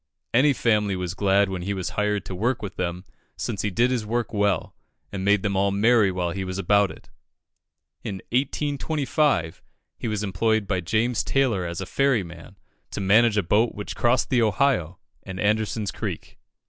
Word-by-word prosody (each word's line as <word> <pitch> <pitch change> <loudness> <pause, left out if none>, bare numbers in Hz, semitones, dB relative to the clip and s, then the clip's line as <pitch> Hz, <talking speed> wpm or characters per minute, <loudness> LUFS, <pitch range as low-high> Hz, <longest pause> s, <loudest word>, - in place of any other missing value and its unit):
Any 135 +5 +5
family 105 -6 +1
was 90 -1 -3
glad 100 +1 +2
when 95 -2 -4
he 100 +3 -2
was 95 -2 -3
hired 105 -1 -1
to - - -6
work 115 +6 -1
with 100 - -6
them, 90 +1 -3 0.3
since 110 -5 -3
he 105 - -1
did 120 +7 +2
his 125 -3 0
work 115 +2 -2
well, 100 -4 0 0.4
and 95 -2 -4
made 100 0 +3
them 100 -2 0
all 100 +1 +2
merry 105 +1 +4
while 90 -2 -2
he 95 +2 -4
was 95 0 -4
about 100 +1 +3
it. - - -13 0.9
In 100 - -4 0.2
1825, 140 - 0 0.4
he - - -3
was 105 -1 -2
employed 105 +2 +1
by 95 -2 -1
James 115 +6 0
Taylor 115 -10 +1
as 85 +2 -5
a - - -4
ferry 135 +1 +1
man, 85 -1 -12 0.3
to - - -5
manage 105 +3 +4
a 105 - +2
boat 105 +7 +2
which 105 - -6
crossed 120 0 +1
the 125 -2 +3
Ohio 105 - +1 0.2
and 95 -1 -8
Anderson's 105 -1 0
Creek. - - -6
105 Hz, 185 wpm, -24 LUFS, 95-115 Hz, 0.9 s, Any